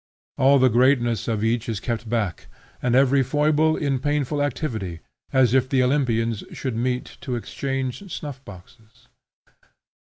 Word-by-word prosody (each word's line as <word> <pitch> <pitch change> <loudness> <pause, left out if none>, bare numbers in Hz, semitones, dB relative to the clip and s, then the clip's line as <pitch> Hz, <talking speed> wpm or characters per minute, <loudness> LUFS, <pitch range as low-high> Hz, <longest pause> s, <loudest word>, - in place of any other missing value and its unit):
All 135 +2 +6
the 130 -1 +5
greatness 120 -2 +2
of 110 -2 -1
each 115 +2 0
is 110 -3 -2
kept 115 -1 -4
back 105 -7 -2 0.3
and 125 0 +1
every 135 +1 +4
foible 150 +3 +2
in 140 -3 0
painful 145 +1 -1
activity, 110 - -3 0.3
as 125 -3 +3
if 130 -1 +3
the 130 -2 +3
Olympians 115 -5 0
should 130 -4 -4
meet 125 +2 -2
to 130 -3 -3
exchange 135 - -4
snuff 145 -4 -6
boxes. 110 +3 -16
125 Hz, 140 wpm, -23 LUFS, 115-140 Hz, 0.3 s, All